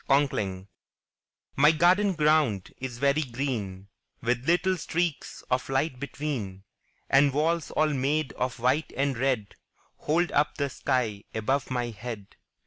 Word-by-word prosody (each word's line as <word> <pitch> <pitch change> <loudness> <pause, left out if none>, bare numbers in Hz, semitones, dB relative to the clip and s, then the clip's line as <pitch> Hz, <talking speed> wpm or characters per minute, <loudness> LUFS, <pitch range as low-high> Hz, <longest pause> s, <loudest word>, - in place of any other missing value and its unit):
Conkling 100 -9 +1 0.9
My 150 +3 +6
garden 185 +5 +4
ground 150 - +2
is 125 -2 -5
very 140 +3 +2
green, 120 -8 -4 0.4
With 125 +2 0
little 180 +2 +3
streaks 170 -2 -2
of 125 +1 0
light 135 0 0
between, 125 -9 -4 0.4
And 140 +1 +5
walls 160 +3 0
all 155 -1 +1
made 140 +2 0
of 125 -1 -2
white 130 +6 +1
and 140 0 +1
red 125 -5 -1 0.4
Hold 170 +4 +1
up 145 +1 +2
the 140 -2 -1
sky 115 -5 -1
above 130 +6 0
my 120 -2 -2
head. 110 -2 -8
135 Hz, 135 wpm, -27 LUFS, 120-150 Hz, 0.9 s, My